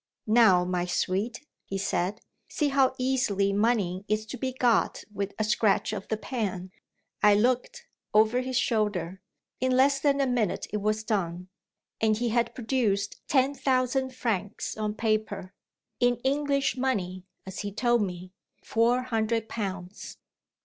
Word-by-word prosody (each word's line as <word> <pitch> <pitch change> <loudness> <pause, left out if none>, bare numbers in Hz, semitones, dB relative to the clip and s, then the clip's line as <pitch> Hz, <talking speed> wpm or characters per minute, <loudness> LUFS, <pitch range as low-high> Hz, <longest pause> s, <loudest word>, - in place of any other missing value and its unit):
"Now, 215 -6 +5
my 180 -1 -1
sweet," 205 +10 -1 0.2
he 195 - -4
said, 195 +1 -1 0.3
"see 295 -2 0
how 270 -1 +3
easily 215 -7 +1
money 200 -4 +1
is 215 +1 0
to 235 +4 -7
be 260 +1 -1
got 245 -3 +1
with 200 0 -4
a 215 - 0
scratch 215 -1 +2
of 200 -2 -5
the 220 - -1
pen." 195 -7 -4 0.5
I 210 -1 +6
looked, 250 - 0 0.3
over 220 +4 +4
his 255 -1 -2
shoulder. 200 -7 0 0.4
In 255 0 +1
less 275 +1 +4
than 280 0 +2
a 275 - +3
minute 245 -7 0
it - - +1
was 215 +1 -1
done; 180 -4 -2 0.5
and 215 -1 +3
he 240 +1 0
had 235 +1 0
produced 220 -5 -1
ten 270 0 +3
thousand 260 -1 0
francs 210 -5 -2
on 215 -1 -2
paper 215 -4 -1 0.5
in 245 0 +3
English 280 0 +1
money 185 -8 -2 0.2
(as 190 0 -7
he 205 -1 -4
told 240 +2 +2
me), 180 -2 -4 0.3
four 235 +3 +2
hundred 225 -2 -1
pounds. 195 -3 -6
220 Hz, 150 wpm, -27 LUFS, 200-255 Hz, 0.5 s, I